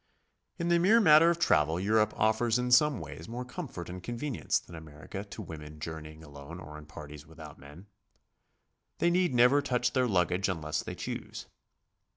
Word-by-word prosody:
In 170 -1 -2
the 170 0 +4
mere 205 +7 +5
matter 160 -4 +7
of 170 - +1
travel 80 - +2
^Europe 105 +4 +2
offers 110 +2 +2
in 125 0 -2
some 140 +1 +5
ways - - -9
more 125 +2 -5
comfort 125 - -7
and 90 +1 -7
convenience 120 - -2
than 85 - -10
America 80 +5 -8
to 105 +1 -9
women 75 -3 -10
jour 80 +1 -6
neying 80 +1 -12
alone 70 -2 -10
or 75 +1 -10
in 75 - -14
parties 75 0 -11
without 80 -2 -12
men. 75 +7 -13 1.1
They 170 - +2
need 180 0 +2
never 125 +4 +5
touch 125 -3 0
their 130 -1 +2
luggage 90 -1 +1
unless 75 -4 -2
they - - -7
choose. - - -6
100 Hz, 180 wpm, -30 LUFS, 80-125 Hz, 1.1 s, matter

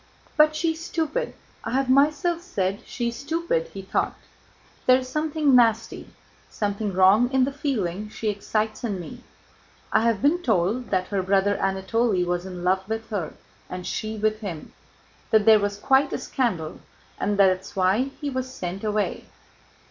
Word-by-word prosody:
"But 305 0 +5
she's 320 0 -1
stupid. 345 +10 -2 0.3
I 225 - -4
have 270 0 +1
myself 300 +6 +3
said 195 - -2
she 240 -2 -2
is 235 - -7
stupid," 335 - -1
he - - -9
thought. - - -1 0.7
"There 255 0 +7
is 255 0 -5
something 305 0 +1
nasty, 230 -2 +2 0.4
something 205 0 -2
wrong, 190 +6 +5
in 265 -1 +3
the 270 - 0
feeling 215 - -2
she 220 - -5
excites 215 +2 -2
in 205 -6 -2
me. 240 +8 -9 0.7
I - - +5
have 230 -3 +2
been 325 +5 +3
told 220 - 0
that 185 -1 0
her 200 -2 0
brother 195 +2 +2
Anatole 195 +1 0
was 175 +1 -2
in 180 -1 -7
love 190 +2 +1
with 225 0 -4
her 180 -7 -3 0.4
and 180 0 -6
she 220 0 -3
with 215 0 0
him, 180 -8 -7 0.6
that 220 -2 +4
there 220 -1 +7
was 205 0 -2
quite 270 +6 +3
a - - 0
scandal 180 -12 -2 0.4
and 205 0 0
that 200 - +7
that's 185 0 0
why 190 +6 +2
he 290 -2 -3
was 260 0 -3
sent 185 -3 -5
away. 210 -1 -1
220 Hz, 170 wpm, -24 LUFS, 195-265 Hz, 0.7 s, There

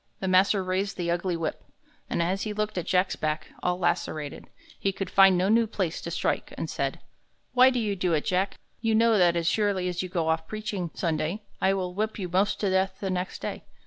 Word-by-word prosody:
The 190 - -3
master 190 +1 +4
raised 190 +2 -1
the 170 -2 -1
ugly 175 0 -1
whip, 160 -2 -3 0.5
and 170 - +1
as 190 +3 -1
he 215 - -2
looked 210 0 -2
at 175 - -6
Jack's 185 0 +2
back, 155 0 -2
all 180 0 0
lacerated, 155 -4 -2 0.3
he 195 - +1
could 195 0 -5
find 195 -1 +6
no 185 +2 +2
new 225 +2 +4
place 185 -6 -2
to - - -5
strike, - - -1
and - - -3
said: - - -2 0.5
"Why 255 +1 +7
do 255 - -1
you 210 -3 -1
do 180 -2 0
it, 150 - 0
Jack? 190 +2 0 0.2
You 225 -1 +1
know 225 -1 +4
that 175 -1 +4
as 170 -1 0
surely 195 0 +1
as 180 0 -2
you 185 - -5
go 170 -3 0
off 160 0 0
preaching 210 -5 -4
Sunday, 165 +4 -1 0.2
I 190 +1 +3
will 180 -2 -3
whip 215 +3 -2
you 190 -4 -3
most 190 +4 +1
to 200 -3 +1
death 190 0 +1
the 195 -2 -2
next 185 0 -3
day. - - -4
185 Hz, 225 wpm, -27 LUFS, 175-205 Hz, 0.5 s, Why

